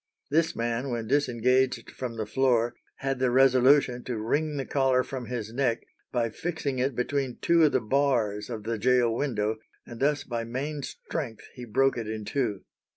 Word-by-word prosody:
This 160 +2 +2
man, 120 +3 -1
when 120 -2 -2
disengaged 130 -1 +1
from 120 -3 -5
the 110 - -2
floor, 120 0 +2 0.2
had 135 -1 -2
the 130 -1 +2
resolution 130 0 +4
to 125 -3 -3
wring 145 +7 -1
the 135 - -2
collar 130 -2 +2
from 130 -3 -6
his 115 -3 -4
neck 125 -3 0 0.3
by 115 -2 0
fixing 150 -3 -3
it 130 0 0
between 130 +1 -1
two 170 -1 +4
of 150 - +3
the 130 - +2
bars 115 -4 +1
of 110 -3 -5
the 115 0 -2
gaol 120 0 +3
window, 110 -5 -1 0.3
and 120 -1 -10
thus 145 0 +1
by 115 -2 -3
main 140 +6 -4
strength 115 -3 -6
he 125 - -8
broke 130 +3 +2
it 115 - -5
in 110 -1 -4
two. 115 -8 -1
125 Hz, 180 wpm, -27 LUFS, 115-135 Hz, 0.3 s, resolution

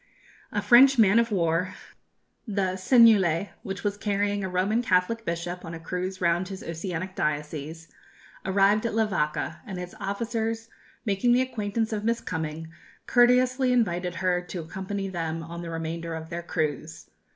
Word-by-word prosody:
A 205 - -1
French 250 +5 +7
man 220 0 +6
of 230 -1 +1
war, 175 0 0 0.7
the 195 -3 0
Seignelay, 200 -4 +5
which 195 0 -6
was 205 -1 -1
carrying 205 0 0
a 190 - -2
Roman 190 +6 +1
Catholic 225 +1 +1
bishop 170 +1 -4
on 165 0 -6
a - - -8
cruise 180 +3 -4
round 175 +1 +1
his 190 0 -7
oceanic 175 +2 -4
diocese, 150 +1 -3 0.6
arrived 200 +3 +3
at 225 - -4
Levaka, 185 -9 0
and 190 -3 -7
its 180 0 -6
officers 225 +2 -3 0.4
making 210 +3 +2
the 250 - +4
acquaintance 220 -2 -2
of 210 -1 -2
Miss 230 +1 +1
Cumming, 160 -3 -5 0.3
courteously 250 +1 +4
invited 180 -7 +1
her 180 -1 +1
to 180 0 -6
accompany 190 +4 -4
them 165 -3 -3
on 170 +1 -7
the 170 - -6
remainder 165 0 -4
of 160 +1 -8
their 170 0 -3
cruise. 155 -2 -3
190 Hz, 155 wpm, -26 LUFS, 170-215 Hz, 0.7 s, French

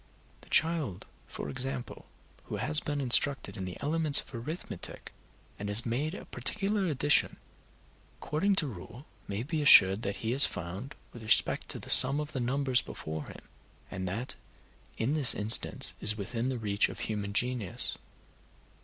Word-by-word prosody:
The - - -18
child, 155 - +1 0.2
for - - -7
example, 135 -1 -5 0.4
who - - -6
has 145 +8 +2
been 145 -2 -4
instructed 130 -4 +4
in 95 -3 -6
the 90 - -8
elements 155 0 +4
of - - -9
arithmetic, 150 +9 -7 0.5
and 100 0 -5
has 105 +3 +2
made 140 +9 -3
a - - -10
particular 195 - -2
addition, 145 -1 +1 0.8
according 195 +7 -1
to 175 - +1
rule, 110 - -11 0.2
may 100 +3 -4
be 155 +3 -3
assured 100 -8 +7
that 100 -3 -4
he 110 - -1
has 135 +3 +7
found, 95 - -8 0.2
with 120 - -11
respect 110 - 0
to - - -5
the - - -5
sum 140 +3 +7
of 150 0 -5
the 130 - -5
numbers 130 0 0
before 80 -1 -8
him, - - -12 0.5
and 95 0 -5
that 110 +8 -4 0.6
in 125 +6 -1
this 150 -5 +3
instance 105 +2 0
is 105 +1 +1
within 115 +5 -4
the 130 - -3
reach 100 -3 0
of - - -9
human 105 -2 -4
genius. 120 -2 0
125 Hz, 160 wpm, -29 LUFS, 105-145 Hz, 0.8 s, assured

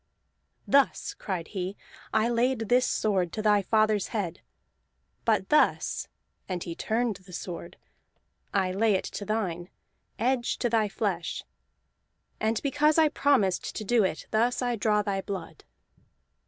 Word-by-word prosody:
"Thus," 275 - +3
cried 180 -5 -4
he, 190 0 -4 0.3
"I 220 +1 +3
laid 240 -1 +1
this 250 +1 +4
sword 190 -5 +1
to 215 - -2
thy 210 -1 +4
father's 215 0 +2
head. 185 -6 -3 0.8
But 215 -4 +2
thus" 300 - +2 0.4
(and 180 -2 -2
he 170 - -5
turned 220 +3 -1
the 185 0 -17
sword) 170 0 -6 0.7
"I 190 -2 +1
lay 210 +2 +2
it 185 - 0
to 205 - -6
thine, 185 -5 -2 0.5
edge 245 +1 0
to 240 - -1
thy 220 -2 +2
flesh. - - -2 1.0
And 220 0 +1
because 295 +2 +3
I 315 -1 +6
promised 255 -12 +1
to 215 - -3
do 225 +1 +3
it, 185 -4 -2
thus 235 +3 +2
I 245 -1 0
draw 210 -1 +2
thy 195 -1 -1
blood!" 195 -1 -7
215 Hz, 140 wpm, -28 LUFS, 190-235 Hz, 1.0 s, I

